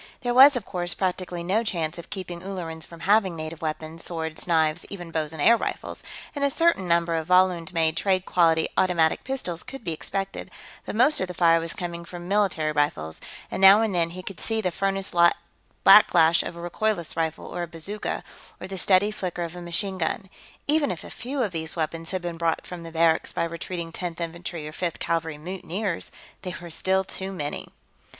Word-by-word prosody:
There 245 -1 0
was, 270 +3 +9
of 235 -5 -3
course, 175 -1 0
practically 180 -2 -2
no 200 +6 +1
chance 170 -5 -2
of 170 - -10
keeping 180 -4 -6
Ullerans 170 -4 -6
from 170 -1 -12
having 200 -3 +3
native 155 0 -6
weapons, 160 +1 -4
swords, 160 -1 -5
knives, 160 -3 +2
even 175 -4 -7
bows 155 -2 -1
and 160 - -7
air 230 +11 +6
rifles, - - -4 0.3
and 285 - -2
a 280 - +4
certain 330 - +2
number 170 0 +2
of 160 -1 -2
Volund 180 -1 +3
made 160 -2 +2
trade 185 +1 +1
quality 165 -2 +3
automatic 170 -4 +2
pistols 220 -11 -3
could 270 -1 -9
be 170 - -2
expected, 195 +5 -4 0.4
but - - -4
most 275 +7 +5
of 185 - 0
the 180 - -7
fire 165 -1 +5
was 165 0 -3
coming 170 -1 -5
from 175 0 -9
military 190 -6 +1
rifles, 85 - -1 0.3
and - - -3
now 195 +3 +9
and 220 -3 0
then 170 -2 +2
he 185 +2 -8
could 195 -1 -7
see 225 0 0
the 185 -4 0
furnace 195 +2 -1
like 170 0 +5 0.5
backflash 170 -5 +7
of 170 - -6
a - - -9
recoilless 195 -2 -1
rifle 160 -1 -2
or 175 - -5
a 175 - -3
bazooka, 170 +6 -4 0.4
or - - -6
the 190 0 -5
steady 195 +3 +4
flicker 180 -4 -4
of 170 0 -6
a 175 - -7
machine 185 +3 -2
gun. 180 +4 -2 0.4
Even 300 -2 +3
if 180 -3 -4
a - - -9
few 260 +2 -3
of 210 - -2
these 160 -1 -3
weapons 165 0 -3
had 185 -2 -3
been 170 -1 -4
brought 165 -1 0
from 180 -1 -8
the 165 0 -9
barracks 165 0 +2
by - - -1
retreating 170 0 -4
Tenth 170 0 -5
Infantry 170 -1 -5
or - - -7
Fifth 170 +1 -3
Cavalry 165 -2 -2
mutineers, 185 +3 -4 0.3
there 180 -2 -5
were 170 -1 -9
still 190 +3 +1
too 190 0 -6
many. 150 -6 -4
175 Hz, 205 wpm, -25 LUFS, 165-195 Hz, 0.5 s, was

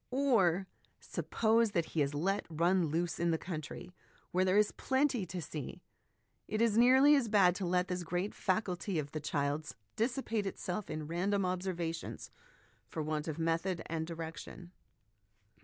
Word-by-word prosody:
Or 225 -10 +3 0.3
suppose 225 -1 +1
that 170 -2 0
he 160 - +2
is 140 +1 0
let 195 +7 0
run 170 +2 +2
loose 165 +2 -1
in 170 0 +2
the 165 - +2
country 165 +1 -6 0.4
where 185 +1 +2
there 185 +1 +3
is 210 0 +4
plenty 260 -7 0
to 180 +2 -5
see, 150 -3 -7 0.6
it 215 - -2
is 230 -2 +3
nearly 260 +5 +7
as 270 -5 +2
bad 195 -4 +5
to 190 - -2
let 180 +1 +1
this 180 0 -2
great 175 +4 -2
faculty 185 -2 -1
of 145 -2 -3
the 155 - -3
child's 145 +1 -2 0.2
dissipate 225 -3 -1
itself 190 +1 -4
in 155 0 -4
random 185 +5 0
observations 180 -3 -3 0.6
for 160 - -4
want 155 0 -2
of 155 -1 -3
method 165 +2 0
and 160 0 -3
direction. 165 +1 -7
180 Hz, 155 wpm, -33 LUFS, 165-205 Hz, 0.6 s, nearly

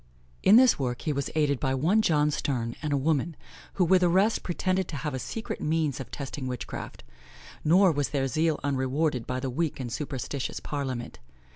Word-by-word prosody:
In 195 - +6
this 255 - +6
work 125 -2 -2
he 155 - 0
was 140 -1 -2
aided 145 -4 +2
by 135 -2 0
one 175 +11 +3
John 150 -6 +2
Stern, 120 -5 -2
and 150 -1 -2
a 140 - +2
woman, 155 +3 0 0.4
who 185 - +2
with 185 +2 +4
the 175 - +4
rest, 195 +6 +3
pretended 185 +1 -1
to - - -6
have 135 -2 -3
secret 220 - -5
means 155 -3 0
of 130 -3 -7
testing 135 0 -5
witchcraft; 125 -1 -6 0.6
nor 180 +4 +5
was 145 -2 -1
their 135 -2 0
zeal 155 +2 +1
unrewarded 135 -1 0
by 130 0 -2
the 130 0 -3
weak 160 +3 -1
and 120 -3 -4
superstitious 140 -2 -4
parliament. 130 -5 -4
145 Hz, 185 wpm, -27 LUFS, 130-165 Hz, 0.6 s, In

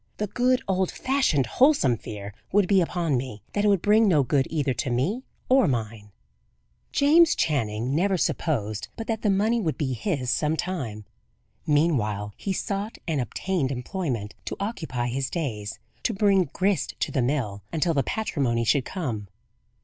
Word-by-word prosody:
The 210 - -1
good, 250 +4 +1
old 190 -1 +1
fashioned, 260 - +1
wholesome 250 - +4
fear 105 -2 -8 0.2
would 200 -1 +3
be 195 -1 +4
upon 170 -5 0
me, 120 -5 -5
that 205 - 0
it - - +5
would 200 -4 +3
bring 215 +1 +5
no 155 -7 +4
good 135 +1 +1
either 145 -4 0
to 125 +3 -2
me 140 - 0 0.3
or 260 -4 +5
mine. 110 -5 -3 0.8
James 320 +4 +5
Channing 120 -4 0
never 190 +5 +2
supposed 110 - -1
but 225 - -5
that 220 -1 -2
the 210 - +1
money 215 +4 +2
would 160 -6 -1
be 135 -4 -1
his 130 - -1
some 155 +1 +1
time. 120 - -4 0.6
Meanwhile 110 -10 +1
he 195 - -4
sought 200 +3 -3
and 155 -5 0
obtained 155 +2 -1
employment 125 - -3
to - - -3
occupy 160 - -3
his 130 +1 -2
days; 110 - -3 0.2
to 225 - -1
bring 195 -2 +4
"grist 190 -4 0
to - - -1
the 135 - +1
mill," 120 -6 -1
until 165 +1 +1
the 140 - +2
patrimony 135 - -1
should 130 +3 +2
come. 120 - -4
155 Hz, 165 wpm, -25 LUFS, 120-195 Hz, 0.8 s, it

